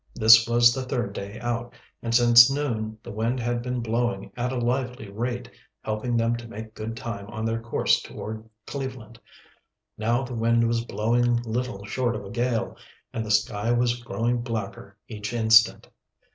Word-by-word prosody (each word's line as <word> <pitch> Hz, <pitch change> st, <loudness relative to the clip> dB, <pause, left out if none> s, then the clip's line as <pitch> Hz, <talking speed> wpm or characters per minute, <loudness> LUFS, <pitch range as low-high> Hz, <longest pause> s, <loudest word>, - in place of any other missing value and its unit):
This 110 Hz, 0 st, +7 dB
was 120 Hz, 0 st, +5 dB
the 130 Hz, -, -3 dB
third 125 Hz, -6 st, -3 dB
day 100 Hz, +2 st, -7 dB
out, 120 Hz, 0 st, -3 dB, 0.3 s
and 115 Hz, 0 st, -1 dB
since 120 Hz, 0 st, +8 dB
noon 115 Hz, -6 st, -2 dB
the -, -, -8 dB
wind 115 Hz, +4 st, -1 dB
had 120 Hz, 0 st, -1 dB
been 125 Hz, 0 st, -3 dB
blowing 115 Hz, -3 st, -2 dB
at 125 Hz, +1 st, -2 dB
a 130 Hz, -, -3 dB
lively 125 Hz, -3 st, -2 dB
rate, 120 Hz, +3 st, -3 dB, 0.4 s
helping 110 Hz, +3 st, -1 dB
them 115 Hz, +1 st, +1 dB
to 120 Hz, 0 st, -9 dB
make 110 Hz, 0 st, -9 dB
good 115 Hz, +1 st, -6 dB
time 115 Hz, -5 st, -6 dB
on 110 Hz, 0 st, -5 dB
their 115 Hz, 0 st, -1 dB
course 115 Hz, -, +1 dB
toward 110 Hz, +1 st, -8 dB, 0.2 s
Cleveland. 130 Hz, -5 st, -7 dB, 0.8 s
Now 120 Hz, +4 st, +1 dB
the 130 Hz, -1 st, -6 dB
wind 115 Hz, 0 st, +2 dB
was 115 Hz, 0 st, 0 dB
blowing 120 Hz, +2 st, +1 dB
little 120 Hz, -3 st, -3 dB
short 120 Hz, +2 st, -1 dB
of 105 Hz, -, -6 dB
a 100 Hz, -, -9 dB
gale, 120 Hz, 0 st, -1 dB, 0.4 s
and 115 Hz, -, -2 dB
the 110 Hz, -, -7 dB
sky 105 Hz, +1 st, +1 dB
was 120 Hz, 0 st, +1 dB
growing 120 Hz, 0 st, -1 dB
blacker 110 Hz, -4 st, -5 dB
each 105 Hz, 0 st, -6 dB
instant. 110 Hz, -1 st, +4 dB
115 Hz, 175 wpm, -25 LUFS, 110-120 Hz, 0.8 s, since